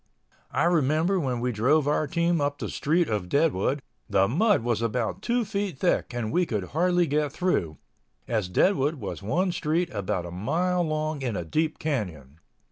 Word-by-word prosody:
I - - +1
remember 165 +3 +2
when 125 -6 -1
we 125 +1 0
drove 135 +7 +2
our 150 +1 +1
team 170 +1 +1
up 145 0 0
the - - -4
street 165 +3 +1
of 105 -5 -2
Deadwood 140 - +1 0.3
the 100 -1 +3
mud 185 - +2
was 120 -2 0
about 115 - -1
two 240 +1 0
feet 200 -7 -3
deep 180 - +2
and 120 -3 -3
we 175 +1 +2
could 105 -5 -3
hardly 175 +2 +2
get 150 -1 0
through, 135 - -1 0.5
as 110 -6 -1
Deadwood 150 - +2
was 105 -8 -6
one 170 - 0
street 165 +1 -1
about 100 -3 -2
a 85 - -7
mile 170 - 0
long 155 -2 -2
in 120 -5 -2
a 85 - -3
deep 155 - 0
canyon. 85 - -4
145 Hz, 180 wpm, -26 LUFS, 110-170 Hz, 0.5 s, the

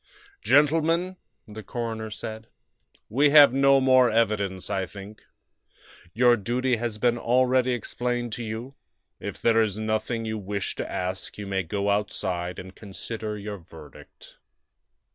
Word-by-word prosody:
"Gentlemen," 165 +5 +2 0.3
the 110 +1 -9
coroner 110 0 -4
said, 110 +1 -7 0.6
"we 140 +6 +3
have 145 -3 +8
no 135 0 +5
more 130 -2 +5
evidence, 105 -4 0
I 95 -2 -2
think. 100 +1 -11 0.9
Your 120 +1 +4
duty 120 +3 0
has 115 -2 -3
been 120 +2 +1
already 125 +1 +2
explained 120 0 -3
to 120 - -4
you; 115 +4 -6 0.5
if - - -6
there 115 -1 +3
is 105 -2 -1
nothing 110 +1 -2
you 110 0 -3
wish 100 0 -3
to - - -4
ask 95 +1 -4
you 105 - -6
may 95 -1 -1
go 100 +3 -1
outside 90 -3 -2
and 95 0 -9
consider 105 +1 -6
your 105 -1 -6
verdict." 80 -3 -15
110 Hz, 140 wpm, -25 LUFS, 100-125 Hz, 0.9 s, have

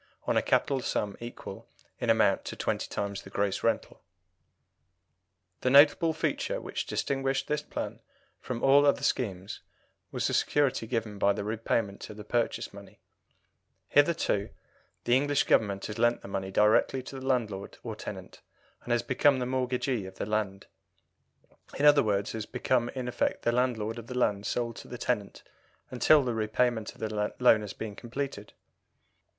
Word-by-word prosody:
on - - 0
a - - +4
capital 135 -2 +1
sum 105 -4 -2
equal 120 +1 -9 0.3
in - - -2
amount - - +3
to - - -6
twenty - - -2
times 100 -1 -3
the - - -12
gross 100 0 -1
rental. - - -1 1.6
The 130 - +1
notable 145 +4 +6
feature 160 0 -1
which - - -5
distinguished 135 0 -1
this 150 0 0
plan - - -5 0.4
from 125 -2 -5
all 140 +1 +6
other 140 0 +2
schemes 100 -8 -2 0.5
was - - -2
the - - 0
security 140 -6 +1
given 110 -3 -3
for 100 0 +3
the 105 - -3
repayment 110 -1 -2
of 105 - -9
the 105 - -8
purchase 120 +2 -1
money: - - -13 0.9
hitherto 145 -9 +2 0.5
the 120 - +3
English 145 +1 +2
Government 100 -3 +2
has 105 +1 -6
lent 120 0 +2
the - - -8
money 95 -1 -3
directly 105 +6 +3
to 135 +1 -8
the 130 - -7
landlord 110 -7 -1
or - - -5
tenant, - - -8 0.4
and 120 - -5
has 120 - +1
become 135 +1 +3
the 125 - -1
mortgagee 125 -4 -1
of 95 - -11
the - - -4
land 105 -2 -2 1.1
in 145 - +1
other 145 -1 +7
words, 100 -3 0
has 110 -1 -5
become 125 -1 0
in 130 -1 -3
effect 125 - -1
the 120 - +2
landlord 120 -2 0
of 115 - -11
the 125 - -5
land 105 -4 +1
sold 115 -2 -2
to - - -10
the 125 - -7
tenant 110 -5 -2 0.5
until 140 +4 +5
the 125 -2 -1
repayment 110 +1 0
of - - -17
the 105 -1 -2
loan 120 -3 +6
has 105 -2 -6
been 110 -2 -6
completed. 120 -3 -5
120 Hz, 165 wpm, -29 LUFS, 105-130 Hz, 1.6 s, other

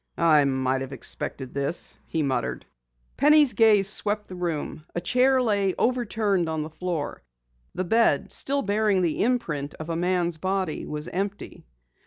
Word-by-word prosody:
"I 155 -3 +5
might 130 -1 0
have 135 +1 -6
expected 130 +1 -4
this!" 140 +5 -2
he 160 -2 -1
muttered. 135 -2 -2 0.5
Penny's 295 -2 +5
gaze 210 -3 +5
swept 210 0 +1
the 185 - -7
room. 165 -3 -4
A - - 0
chair 255 +8 +3
lay 200 -5 +1
overturned 215 -7 0
on 160 -1 -2
the 155 - -8
floor. 165 -2 -4 0.5
The 185 - -2
bed, 225 +6 +2
still 280 +1 +2
bearing 205 -2 +1
the 165 -3 0
imprint 170 - -1
of 155 +1 -8
a 165 - -1
man's 175 -1 0
body, 190 -3 -2
was 150 +2 -3
empty. 195 - -5
180 Hz, 155 wpm, -25 LUFS, 155-210 Hz, 0.5 s, I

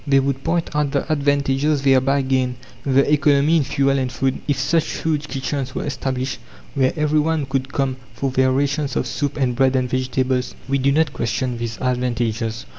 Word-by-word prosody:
They 135 -1 +5
would 135 0 -1
point 165 -2 -1
out 150 -2 0
the - - 0
advantages 140 0 +1
thereby 135 +1 +3
gained, 130 -1 0 0.3
the 140 +2 +3
economy 150 +1 +4
in 155 - +2
fuel 140 0 +1
and 130 -1 -2
food, 130 +1 -1
if 145 -3 +1
such 155 +4 0
huge 155 -2 0
kitchens 135 -1 -3
were - - -2
established, 130 -2 -3 0.3
where 130 -2 +2
every 150 0 +2
one 155 -1 0
could 135 0 -2
come 135 -2 -1 0.2
for 135 +3 -2
their 130 0 +3
rations 140 +2 0
of - - 0
soup 140 +4 -3
and 130 -4 0
bread 135 +1 +3
and 130 -1 +1
vegetables. 130 0 -1
We 140 +1 +1
do 135 +1 +2
not 150 -1 +2
question 120 +1 -2
these 115 -2 -4
advantages. 120 -3 -1
135 Hz, 190 wpm, -21 LUFS, 130-145 Hz, 0.3 s, They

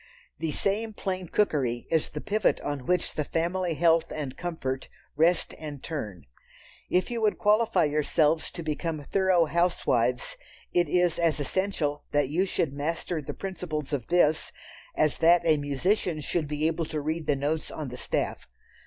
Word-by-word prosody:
The 160 -2 -1
same 215 +7 -1
"plain 185 -3 -3
cookery" 135 - 0
is 160 -2 +2
the 150 - -6
pivot 210 0 +1
on 145 -3 -4
which 180 -1 +1
the 150 - -1
family 170 +2 -1
health 165 0 +3
and 140 -4 -4
comfort 135 -7 -4 0.3
rest 165 +4 +2
and 150 -3 -7
turn. 105 - -5 0.6
If 180 +5 +1
you 235 -1 -2
would 215 -1 +2
qualify 215 0 +3
yourselves 150 +1 +2
to 170 - -6
become 155 0 -3
thorough 185 +1 +3
housewives, 180 - +1 0.4
it 175 -3 +3
is 175 -1 +2
as 165 -3 +2
essential 150 -2 -1
that 145 -2 +2
you 180 +6 +1
should 160 -6 -1
master 160 +3 -2
the 140 - -6
principles 160 -6 -4
of 130 -5 -2
this, 160 -3 +3 0.4
as 155 -2 +2
that 170 +1 +5
a 160 -2 +5
musician 155 +4 0
should 150 +1 -1
be 150 +1 -1
able 165 0 0
to 155 0 -3
read 155 +1 -3
the 145 - +3
notes 150 +3 -1
on 150 -4 -5
the 125 - -7
staff. - - -2
160 Hz, 165 wpm, -27 LUFS, 150-180 Hz, 0.6 s, that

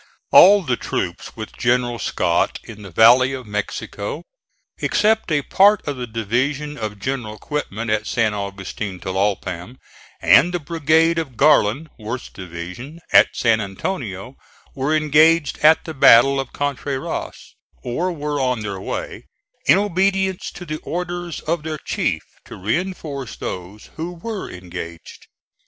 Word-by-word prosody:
All 200 +1 +8
the 125 -6 -1
troops 85 -1 -4
with 110 -1 -8
General 120 -1 0
Scott - - 0
in 105 -2 -11
the 100 - -9
valley 120 +8 +5
of 130 -2 -6
Mexico, 105 - -4 0.6
except 220 -3 +1
a 145 -2 +2
part 205 +4 +4
of 145 - -2
the 125 -1 -5
division 130 +7 -2
of 110 -5 -5
General 110 -1 -4
Quitman 115 -5 -4
at 110 0 0
San 110 -3 +1
Augustin 100 -1 -5
Tlalpam 95 +3 -2 0.4
and 125 - +5
the - - 0
brigade 165 +1 +2
of 135 -8 -6
Garland 145 -1 +3
(Worth's 115 +4 -5
division) 90 - -8
at - - +8
San 115 -2 +2
Antonio, 100 - -5 0.4
were 140 +3 0
engaged 155 +1 +3
at 155 +1 +5
the 160 - -5
battle 135 0 +6
of 135 -2 -4
Contreras, 140 -1 -4 0.3
or 165 +10 -1
were 150 -3 -3
on 125 -3 0
their 100 -3 -5
way, - - -5 0.4
in 145 - +7
obedience 195 -1 0
to 180 - -10
the 155 -2 -5
orders 175 -1 -4
of 165 +1 -1
their 155 0 -4
chief, - - -2 0.2
to - - -10
reinforce 140 - -3
those 95 +4 -7
who 165 +2 -4
were 200 +4 -6
engaged. 85 -2 -9
130 Hz, 140 wpm, -21 LUFS, 105-160 Hz, 0.6 s, All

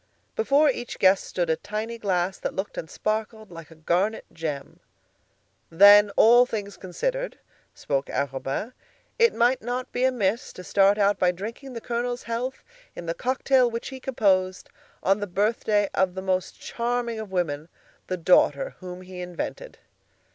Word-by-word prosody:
Before 305 -9 +3
each 245 -3 -2
guest 190 0 +4
stood 175 -3 -1
a - - +2
tiny 215 +7 -5
glass 190 -2 -1
that - - -4
looked 190 +2 -4
and 160 - -6
sparkled 215 -1 -3
like 165 -2 -10
a 160 - -15
garnet 180 +7 0
gem. 150 -4 -5 0.9
"Then, 205 +4 +8
all 240 +2 +7
things 205 -4 -5
considered," - - -3 0.4
spoke 140 -1 -2
Arobin, 135 - -3 0.5
"it 465 0 +4
might 245 +2 +2
not 245 +2 -4
be 250 - -1
amiss 235 -4 0
to 180 - -10
start 200 +2 +3
out 205 0 +2
by 180 -1 +3
drinking 230 +9 -8
the 230 - -6
Colonel's 245 +1 -3
health 240 +3 -4 0.3
in 175 - -7
the 165 - -1
cocktail 255 +2 +2
which 230 0 -5
he 265 -1 -8
composed, 190 -8 0 0.3
on 195 +2 +3
the 205 - -3
birthday 205 +2 +1
of 190 -1 +1
the 190 - -5
most 185 -1 -2
charming 235 -1 -2
of 215 -2 -6
women—the 170 +1 -4
daughter 185 - +3
whom 180 0 -8
he 185 -1 -9
invented." 180 - -6
205 Hz, 155 wpm, -25 LUFS, 180-240 Hz, 0.9 s, Then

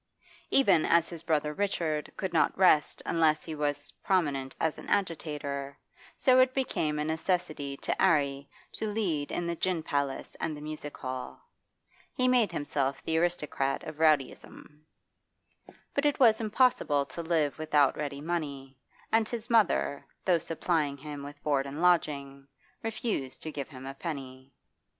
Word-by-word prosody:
Even 265 -12 +5
as 170 0 +3
his 170 -2 -7
brother 150 -2 0
Richard 160 -5 -1
could 190 -2 -3
not 165 - +2
rest 180 -5 +4
unless 155 -2 +2
he 160 - -5
was 145 -1 -2
prominent 145 -8 0
as 160 -1 0
an - - -10
agitator, 145 -6 -2 0.4
so 255 -1 +5
it 255 0 +4
became 160 - 0
a 150 - -1
necessity 160 -3 -1
to - - -2
'Arry 140 -6 +2 0.2
to 220 - -4
lead 170 -9 -1
in 175 - -2
the 170 0 -1
gin 175 -1 -1
palace 140 -2 -2
and 155 -2 -2
the - - -10
music 150 -1 -6
hall. 130 - -6 0.8
He 255 - +2
made 245 -6 +4
himself 140 -3 -2
the 160 - -1
aristocrat 150 -5 -1
of 155 -1 -7
rowdyism. 150 0 0 1.1
But 280 +1 +2
it 290 0 0
was 230 -4 +5
impossible 215 - +2
to 140 +5 -7
live 160 -3 0
without 150 -3 +3
ready 145 -2 -4
money, 140 -5 -4 0.3
and 225 -1 +3
his 235 0 -5
mother, 210 -10 +2 0.2
though 180 -3 +4
supplying 160 -3 -1
him 145 0 -7
with 145 +1 -10
board 140 -2 +1
and 140 +3 -6
lodging, 140 -6 +1 0.3
refused 220 - -3
to 155 - -4
give 140 -3 -5
him 130 -3 -10
a 135 - -5
penny. 135 -4 -7
155 Hz, 155 wpm, -29 LUFS, 140-175 Hz, 1.1 s, Even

